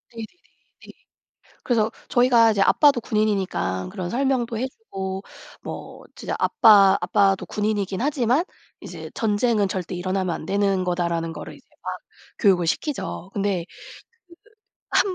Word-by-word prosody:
네네네. 225 -1 -5 0.6
네. - - -11 0.7
그래서 225 -3 +1 0.2
저희가 245 -2 +5
이제 200 -2 +1
아빠도 285 0 +4
군인이니까 200 - -1
그런 185 -4 -4
설명도 250 -3 0
해 255 - -1
주고 195 - -6 0.4
뭐 - - -8
진짜 - - -4
아빠 210 -8 +6
아빠도 195 -2 +2
군인이긴 205 -2 -2
하지만 265 +2 +1 0.4
이제 - - -9
"전쟁은 210 -1 +1
절대 185 -1 -4
일어나면 185 0 -1
안 155 - -7
되는 195 -1 +1
거다."라는 170 -2 -1
거를 150 -1 -8
이제 - - -22 0.2
막 - - -1 0.5
교육을 185 -6 +3
시키죠. 190 - -3
근데 195 -4 -1
그 - - -16 1.1
1 385 - +2
205 Hz, 295 characters per minute, -23 LUFS, 185-235 Hz, 1.1 s, 아빠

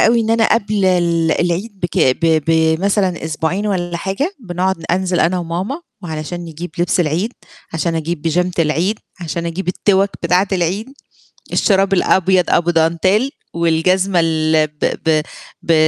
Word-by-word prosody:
أوي 230 +1 +4
إن 225 0 -1
أنا 225 -1 +3
قبل 210 -3 0
ال 170 -3 +2
العيد 190 +4 -2
بك 175 -2 -2 0.3
ب 160 -2 +3
بمثلًا 165 +3 +1
أسبوعين 160 +6 -2
والّا 175 -4 -1
حاجة، 195 - -2
بنقعد 185 -3 -1
ن - - -10
أنزل 180 0 +1
أنا 180 +2 +2
وماما، 180 - -3 0.2
وعلشان 160 +1 -5
نجيب 170 +1 -7
لبس 175 +1 +1
العيد، 175 +8 0 0.4
عشان 165 +1 -1
أجيب 160 -1 -3
بيجامة 180 +2 0
العيد، 165 +7 +1 0.2
عشان 170 0 -3
أجيب 170 +2 -4
التِوَك 195 +1 +2
بتاعة 180 +3 +2
العيد، 190 +6 -1 0.6
الشراب 195 -1 +2
الأبيض 185 0 +3
أبو 175 0 +2
dentelle 170 +9 +2 0.2
والجزمة 175 +3 +2
ال 155 -1 +2
ب 150 -1 -2
ب 155 -1 +3 0.4
ب 170 - +1
175 Hz, 145 wpm, -17 LUFS, 165-190 Hz, 0.6 s, أوي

